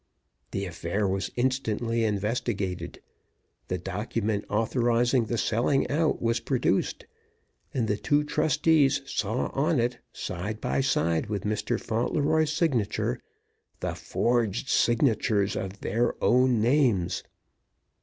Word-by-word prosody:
The 100 0 -3
affair 90 +3 -2
was 95 +1 -1
instantly 120 -2 0
investigated; 100 -5 -2 0.7
the 90 - -1
document 105 +3 -2
authorizing 120 +2 +2
the 115 +2 -2
selling 120 +6 +1
out 155 +2 +1
was 115 0 +1
produced; 125 -7 0 0.7
and 120 -4 -1
the 105 - 0
two 145 +7 +2
trustees 150 -2 +2
saw 110 -2 -1
on 150 +1 +1
it, 120 +1 0
side 100 +5 -5
by 135 - 0
side 85 -11 +1
with 105 -2 -3
Mr. 105 0 -1
Fauntleroy's 150 +7 +1
signature, 150 - 0 0.6
the - - -2
forged 120 0 0
signatures 110 -4 +2
of 95 +1 -5
their 120 +4 0
own 125 -1 +4
names. 120 - +2
115 Hz, 115 wpm, -27 LUFS, 105-130 Hz, 0.7 s, own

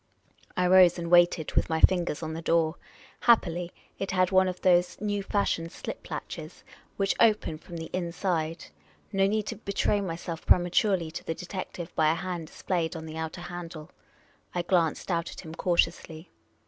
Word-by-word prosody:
I 180 - +2
rose 180 -1 +6
and 170 0 -4
waited, 175 -2 +4
with - - +1
my 160 0 0
fingers 175 -3 +3
on 160 0 -4
the 165 - -5
door. 165 -1 +2 0.5
Happily 180 -7 +3 0.3
it 195 - -3
had 185 0 +2
one 185 0 +5
of 180 -1 -4
those 180 -1 +3
new 205 -1 -1
fa.shioned 195 -4 -1
.slip - - -7
latches - - -7 0.3
which 195 -1 +2
open 210 -8 +3
from 170 - -9
the 160 0 -7
inside. 170 -2 -2 0.5
No 195 0 +3
need 215 +1 0
to - - -5
betray 200 -1 0
myself 170 -2 -5
prematurely 175 -1 +3
to 170 - -7
the 165 - -3
detective 180 -1 -6
by 155 -1 +4
a - - 0
hand 175 -3 -4
displayed 170 0 -2
on 160 -1 -6
the 160 0 -7
outer 160 +1 -5
handle. 175 -2 -8 0.6
I 175 - 0
glanced 170 0 +1
out 170 0 -1
at - - -9
him 160 - -9
cautiously. 165 -1 -1
175 Hz, 175 wpm, -28 LUFS, 165-185 Hz, 0.6 s, rose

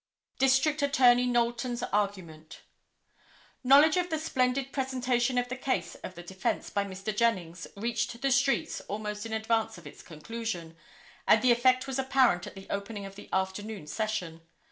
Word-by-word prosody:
District 270 +3 +3
Attorney 250 -4 +4
Knowlton's 240 0 0
Argument. 185 -7 -3 1.0
Knowledge 285 +6 +6
of 355 0 0
the 320 - -1
splendid 270 -3 0
presentation 255 -2 0
of 245 0 +1
the 255 - -4
case 260 0 -2
of 185 - -7
the 175 - -9
defence 190 +2 -3
by 200 - 0
Mr. 195 +2 -5
Jennings 185 -7 0
reached 235 +2 -2
the 275 +1 0
streets 275 +1 +1
almost 210 +1 -4
in 220 - -6
advance 220 -1 0
of 175 - -14
its - - -11
conclusion, 175 -1 -6 0.5
and - - +5
the 250 - +5
effect 255 +2 +3
was 270 -1 -3
apparent 260 -9 +2
at - - -10
the 195 0 -10
opening 200 0 -4
of 195 - -9
the 200 - -12
afternoon 190 0 -3
session. 180 -4 -3
235 Hz, 160 wpm, -29 LUFS, 195-260 Hz, 1.0 s, Knowledge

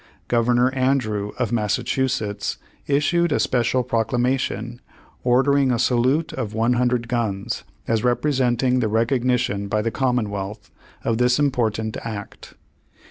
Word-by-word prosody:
Governor 120 +2 +2
Andrew, 125 -6 0
of 125 -2 -1
Massachusetts, 115 -1 -1 0.3
issued 155 +4 +2
a - - +2
special 125 +1 +1
proclamation, 120 0 -1 0.4
ordering 135 +2 +3
a 120 - +1
salute 130 +7 +1
of 105 -1 -4
one 115 +2 +2
hundred 120 -1 +1
guns, 110 -5 -2 0.2
as 110 -1 +1
representing 125 -1 +1
the 115 - +1
recogni 120 +3 +2
tion 100 -5 -2
by 105 +1 0
the 115 - -1
commonwealth, 105 -6 -2 0.3
of 115 0 0
this 125 0 +3
important 110 -6 0
act. 105 -3 -8
120 Hz, 125 wpm, -22 LUFS, 110-130 Hz, 0.4 s, ordering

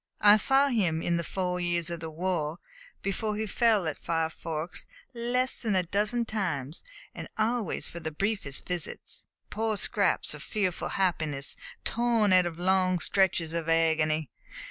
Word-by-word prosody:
I 210 0 +8
saw 270 +6 +4
him, 180 -10 +1
in 170 0 +1
the 170 - -1
four 180 +1 -2
years 175 -1 0
of 170 - -4
the 160 0 -5
war 165 -1 -2 0.5
before 210 +2 -1
he 220 +1 -2
fell 220 -3 +2
at 155 - -4
Five 165 -1 0
Forks, 160 +1 -5 0.3
less 250 +2 -1
than 215 -4 0
a 185 - +3
dozen 210 +6 0
times, 170 - -2 0.3
and - - -7
always 220 -2 0
for 170 - -8
the 160 -1 -3
briefest 190 -4 -1
visits 175 -3 -3 0.3
poor 220 -1 -1
scraps - - +1
of - - -9
fearful 195 -5 -1
happiness 155 -7 0 0.3
torn 230 -4 +2
out 180 -1 +6
of 165 -1 -6
long 185 0 +2
stretches 175 -2 +1
of 165 -1 -2
agony. 160 -1 +2
180 Hz, 160 wpm, -28 LUFS, 165-215 Hz, 0.5 s, I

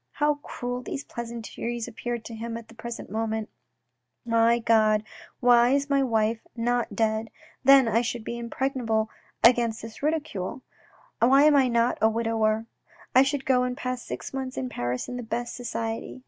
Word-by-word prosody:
How 295 0 +1
cruel 245 -3 -5
these 275 +2 -5
pleasantries 235 0 -5
appeared 240 0 -5
to 230 - -7
him 230 +1 -5
at 230 -1 -11
the - - -13
present 230 -1 -7
moment! 220 0 -2 0.4
" 125 - -53 0.2
My 230 +1 +5
God, 215 -2 +3 0.4
why 245 +1 +5
is 280 0 -1
my 275 0 +4
wife 225 -3 +1 0.2
not 240 -2 -1
dead! 220 +1 0 0.3
then 270 -1 +7
I 225 +1 +3
should 240 -1 -3
be 235 +2 -5
impregnable 235 -3 -1 0.3
against 230 -2 +3
ridicule. 290 - -2 0.6
Why 270 +4 +6
am 300 -1 +6
I 270 -2 +5
not 235 0 +1
a 220 - +5
widower? 225 -1 0 0.5
I 260 - +7
should 275 0 0
go 255 -2 +3
and 250 0 -2
pass 255 -2 -3
six - - -7
months 265 -1 -4
in 255 - -2
Paris 120 - -3
in 250 - -5
the - - -4
best 240 +1 -3
society. 230 0 -4
235 Hz, 170 wpm, -26 LUFS, 225-255 Hz, 0.6 s, then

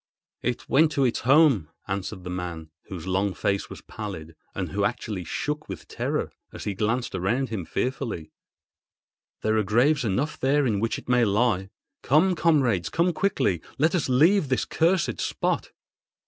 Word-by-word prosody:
"It 125 -1 -2
went 155 +3 +4
to 140 - +2
its 120 - +1
home," 135 - +4 0.2
answered 95 0 -4
the 90 - -5
man, 85 -3 -5
whose 90 -4 -7
long 95 +1 0
face 100 0 -1
was - - -9
pallid, 85 -7 -7 0.2
and - - -3
who - - -1
actually 100 -5 -2
shook 150 - -3
with 95 - -7
terror - - -2 0.2
as - - -8
he 105 - -2
glanced 110 +5 -1
around 110 +8 0
him 105 -7 -4
fearfully. 120 - -3 1.1
"There 110 0 +2
are - - +2
graves 125 +9 +3
enough 120 +8 -1
there 140 +2 +2
in 105 -5 +1
which 115 +2 -1
it - - -11
may 125 -1 +4
lie. 105 -2 +1 0.3
Come, 160 +8 +4
comrades—come 155 - +2
quickly! 155 - +1 0.2
Let 160 +5 +2
us 170 -7 0
leave 155 +5 +4
this 130 - +1
cursed 170 +2 +1
spot." - - -1
115 Hz, 160 wpm, -25 LUFS, 95-145 Hz, 1.1 s, went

